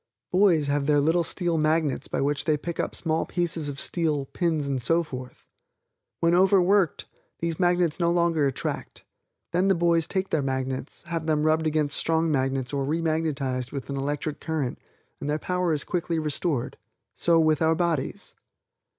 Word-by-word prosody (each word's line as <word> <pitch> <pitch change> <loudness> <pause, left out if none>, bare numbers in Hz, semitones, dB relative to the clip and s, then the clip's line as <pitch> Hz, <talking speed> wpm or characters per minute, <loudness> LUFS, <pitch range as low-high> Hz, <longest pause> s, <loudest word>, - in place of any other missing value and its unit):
Boys 180 -5 +4
have 140 0 0
their 150 -1 +4
little 165 +4 +2
steel 170 -2 -1
magnets 155 -2 +1
by - - -2
which 145 +1 0
they 155 -2 +2
pick 170 +3 -6
up - - -2
small 160 -1 0
pieces 170 -4 -1
of 140 -1 -6
steel, 155 -5 -1
pins 160 0 -1
and 135 -2 -1
so 165 +7 +2
forth. 130 -4 -9 0.7
When 170 0 +3
overworked, 190 0 +3 0.3
these 165 -1 -3
magnets 175 -2 +2
no 170 -1 +2
longer 170 -4 +2
attract. 135 - -4 0.5
Then 180 +2 +2
the 195 - +4
boys 170 -1 +2
take 190 +1 -2
their 155 - +2
magnets, 130 0 -3
have 165 -2 -4
them 155 -1 +2
rubbed 160 0 +2
against 150 -2 +1
strong 165 0 +1
magnets 135 -1 -1
or 140 -1 0
remagnetized 150 -5 -1
with 140 0 -5
an - - -2
electric 145 +2 -3
current 155 -6 -3 0.4
and 145 - -4
their 150 - +1
power 180 +1 -1
is 150 -3 -1
quickly 170 -1 -2
restored 150 -3 -2 0.4
so 170 -1 +3
with 155 -1 +3
our 160 0 +3
bodies. 170 -5 -2
160 Hz, 170 wpm, -26 LUFS, 145-170 Hz, 0.7 s, Boys